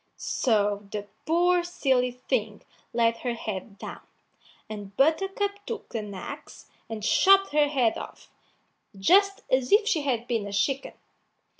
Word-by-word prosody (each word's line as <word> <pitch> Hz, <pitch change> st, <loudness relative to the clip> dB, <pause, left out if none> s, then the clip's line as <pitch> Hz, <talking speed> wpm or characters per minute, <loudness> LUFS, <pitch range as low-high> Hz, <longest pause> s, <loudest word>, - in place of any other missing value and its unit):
So 205 Hz, -4 st, 0 dB
the 205 Hz, -1 st, -4 dB, 0.2 s
poor 350 Hz, +2 st, +3 dB
silly 265 Hz, -8 st, +1 dB
thing 250 Hz, -, -3 dB, 0.3 s
laid 230 Hz, 0 st, +2 dB
her 245 Hz, -1 st, -3 dB
head 205 Hz, -2 st, -6 dB
down, -, -, -8 dB, 0.7 s
and 205 Hz, -2 st, -8 dB
Buttercup 390 Hz, +7 st, +1 dB
took 450 Hz, -1 st, -6 dB
an 210 Hz, -3 st, -4 dB
axe 185 Hz, -, -9 dB, 0.2 s
and 220 Hz, -2 st, -6 dB
chopped 390 Hz, -, +5 dB
her 295 Hz, 0 st, +4 dB
head 255 Hz, -6 st, +1 dB
off, -, -, -11 dB, 0.7 s
just 395 Hz, -, +4 dB
as 260 Hz, -1 st, +2 dB
if 420 Hz, +1 st, +5 dB
she 340 Hz, -9 st, +2 dB
had 245 Hz, -4 st, -1 dB
been 225 Hz, -4 st, -1 dB
a 200 Hz, -, -7 dB
chicken. 270 Hz, +7 st, 0 dB
255 Hz, 140 wpm, -26 LUFS, 215-355 Hz, 0.7 s, chopped